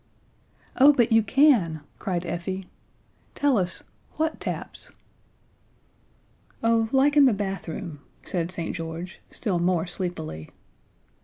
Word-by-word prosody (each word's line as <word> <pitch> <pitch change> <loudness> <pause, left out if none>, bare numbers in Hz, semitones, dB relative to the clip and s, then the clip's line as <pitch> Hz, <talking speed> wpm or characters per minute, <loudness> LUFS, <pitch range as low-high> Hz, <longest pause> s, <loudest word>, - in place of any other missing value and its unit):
"Oh, 280 +3 +8
but 240 -4 +2
you 225 0 +6
can," 215 - +3 0.2
cried 180 -4 -2
Effie. 185 +3 -4 0.7
"Tell 285 -2 +2
us 185 -4 -1 0.3
what 315 0 -1
taps?" - - -6 1.7
"Oh, 230 -1 +3
like 275 +2 +4
in 290 -2 +7
the 255 - +5
bathroom," 190 -6 -4 0.2
said 170 -2 -2
St. 170 -2 -4
George, 165 +2 -6
still 195 -7 -2
more 175 -1 +1
sleepily. 175 - -4
190 Hz, 110 wpm, -25 LUFS, 170-240 Hz, 1.7 s, Oh